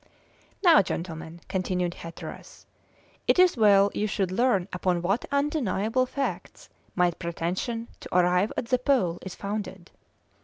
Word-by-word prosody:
"Now, 340 -4 +7
gentlemen," 170 -2 -6
continued 180 -2 -1
Hatteras, 165 -1 -10 0.6
"it - - +4
is 365 -1 +5
well 205 -3 +5
you 210 - -1
should 195 -2 -1
learn 200 -3 +2
upon 180 -1 0
what 195 +7 0
undeniable 255 - 0
facts 275 +2 -5 0.3
my 180 -1 +3
pretension 175 +8 -3
to - - -3
arrive 180 +3 +3
at - - -1
the 255 - +2
Pole 240 - +1
is 190 - -8
founded. 200 -3 -5
195 Hz, 130 wpm, -26 LUFS, 180-240 Hz, 0.6 s, Now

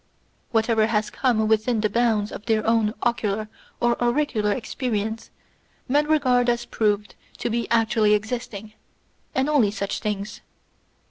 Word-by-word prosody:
Whatever 225 -1 +2
has 215 -1 0
come 230 -5 +1
within 220 +1 +2
the 215 - +2
bounds 215 -1 +1
of 210 - -9
their 220 -2 +1
own 225 -1 +2
ocular 215 -3 0 0.3
or 240 0 +1
auricular 240 -4 +1
experience 225 -1 -3 0.6
men 290 +3 +2
regard 255 -5 +3
as 240 0 0
proved 210 -1 0 0.2
to 235 - -2
be 235 0 -2
actually 225 -2 +3
existing; 220 -1 -5 0.6
and 265 +1 +1
only 285 -9 +3
such 200 -1 -3
things. 210 -1 -4
225 Hz, 135 wpm, -24 LUFS, 210-240 Hz, 0.6 s, regard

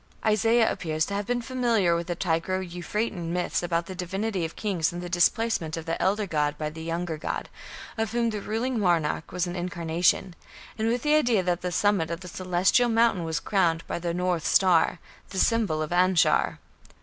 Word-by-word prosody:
Isaiah 225 +2 +3
appears 155 -2 -1
to 200 - -6
have 200 0 -2
been 245 0 -1
familiar 230 -8 +1
with 170 0 -3
the 175 - -2
Tigro 180 +2 -1
Euphratean 175 0 -3
myths 175 0 -1
about 170 -1 -1
the 185 - -7
divinity 190 +2 -3
of 160 - -7
kings 185 -7 -1
and 175 - -6
the 175 0 -6
displacement 175 -2 +1
of 165 - -6
the 165 - -2
elder 205 +3 +1
god 150 -4 -1
by 150 0 -3
the 160 +1 -9
younger 165 0 -3
god, - - -4 0.5
of 225 -1 -1
whom 235 0 +1
the 210 -1 -4
ruling 230 +4 -2
monarch 170 -5 0
was 180 0 -1
an 175 0 -5
incarnation, 175 0 0 0.4
and 220 0 -1
with 240 +1 0
the 300 0 +3
idea 240 -10 +3
that 175 -1 0
the 180 - -3
summit 195 -4 +1
of 170 +1 -4
the 180 - -9
Celestial 185 +7 +2
mountain 225 -5 +3
was 160 -1 -1
crowned 170 -5 +1
by - - -4
the 170 0 -2
"north 180 -2 -1
star", 180 -2 +4 0.3
the 190 - -7
symbol 200 -8 +2
of 155 - -6
Anshar. 180 -1 +3
180 Hz, 195 wpm, -26 LUFS, 170-215 Hz, 0.5 s, star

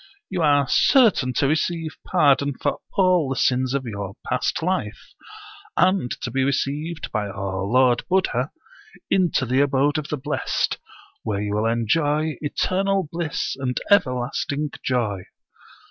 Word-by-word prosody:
You 180 - -1
are 145 -3 +3
certain 210 - +4
to 135 - +1
receive 160 +1 -1
pardon 140 -5 +3
for - - -1
all 180 -6 +3
the 135 - -1
sins 130 0 +1
of 135 -2 -2
your 100 -4 -5
past - - -1
life, 175 - -3 0.6
and 185 -7 +3
to 125 - -3
be 135 +2 +1
received 145 +4 -2
by 105 -2 -1
our 100 -1 -4
Lord 125 +2 +3
Buddha 155 -9 +1 0.6
into 175 -8 +2
the 130 +3 +2
abode 145 +2 +2
of 150 - -6
the 150 - -3
blest, 145 +3 -2 0.4
where 105 -3 -2
you 105 0 -2
will 105 +2 +1
enjoy 145 +7 0
eternal 190 +4 0
bliss 165 -2 -2
and 125 -2 -1
everlasting 140 -3 +1
joy. 110 -7 -1
140 Hz, 140 wpm, -23 LUFS, 125-160 Hz, 0.6 s, certain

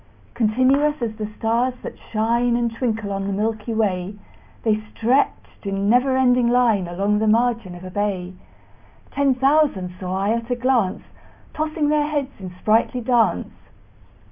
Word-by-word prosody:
Continuous 260 +7 +2
as 220 -2 -3
the 215 -1 -3
stars 235 +3 0
that - - -6 0.2
shine 235 +2 +1
And 235 -1 -1
twinkle 225 -4 -2
on 195 0 -3
the 200 - -2
milky 215 +2 -2
way, 200 -3 -1 0.5
The 215 -1 +1
stretched 250 +5 -1
in 195 +1 -1
never 260 +2 +3
ending 250 -2 +3
line 235 -6 +2
Along 200 +4 0
the 220 - +1
margin 230 -4 +1
of 175 - -11
a 185 - -8
bay: 190 -2 -2 0.8
Ten 275 -2 +2
thousand 270 -9 +2
saw 185 0 -3
I 200 - 0
at 230 +1 -2
a 245 - +1
glance, 240 -6 0 0.5
Tossing 310 -1 -1
their 300 -1 +2
heads 290 -3 -2
in 185 -2 -7
sprightly 215 +7 +1
dance. 240 -1 +1
230 Hz, 155 wpm, -22 LUFS, 200-250 Hz, 0.8 s, never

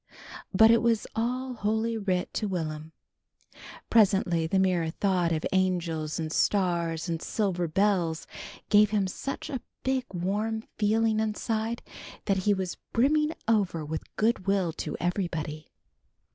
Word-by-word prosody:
But 220 +3 +7
it 230 - +5
was 230 -2 +2
all 250 +3 -1
Holy 220 +1 0
Writ 190 -4 -1
to 215 - -1
Will'm. 160 -4 -4 1.0
Presently 190 -6 +3
the 190 - +1
mere 180 -4 +2
thought 180 -1 +1
of 160 -1 -1
angels 170 -5 0
and 160 -1 -3
stars 170 -4 +1
and 165 -1 -2
silver 185 -5 -1
bells 175 -2 +1 0.4
gave 210 0 +6
him 205 -2 +1
such 275 +11 -5
a 265 -6 -4 0.2
big 260 -1 0
warm 210 +5 -1 0.2
feeling 220 +1 +2
inside, 220 +1 -2 0.4
that 195 - +2
he - - +6
was 190 -2 -3 0.2
brimming 300 +6 +2
over 195 -8 +1
with 155 +1 -3
good 215 -3 +1
will 190 -4 +1
to 150 - -4
everybody. 165 -4 -3
195 Hz, 135 wpm, -28 LUFS, 170-220 Hz, 1.0 s, But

